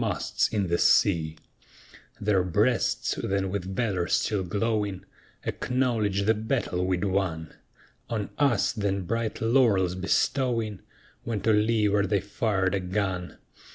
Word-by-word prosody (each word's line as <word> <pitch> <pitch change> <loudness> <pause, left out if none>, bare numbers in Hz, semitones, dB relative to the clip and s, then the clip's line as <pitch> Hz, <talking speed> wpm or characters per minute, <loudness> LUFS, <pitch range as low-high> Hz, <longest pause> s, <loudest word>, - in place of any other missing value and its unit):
Their 100 -3 +2
breasts 90 -3 +1
then 95 -1 -1
with 95 -1 -4
valor 95 -7 0
still 100 0 +1
glowing, 105 +1 -1 0.4
Acknowledged 115 -6 0
the 110 - +4
battle 110 -5 -1
we'd 95 0 0
won, 95 -5 -1 0.6
On 110 -3 -3
us 135 -8 +3
then 100 -3 -1
bright 115 +4 -2
laurels 110 -7 +3
bestowing, 110 +3 0 0.4
When 110 -4 -3
to 110 +3 +3
leeward 105 -2 +2
they 100 - +2
fired 100 -2 -1
a 100 - +1
gun. 90 -2 -3
100 Hz, 110 wpm, -27 LUFS, 95-110 Hz, 0.6 s, the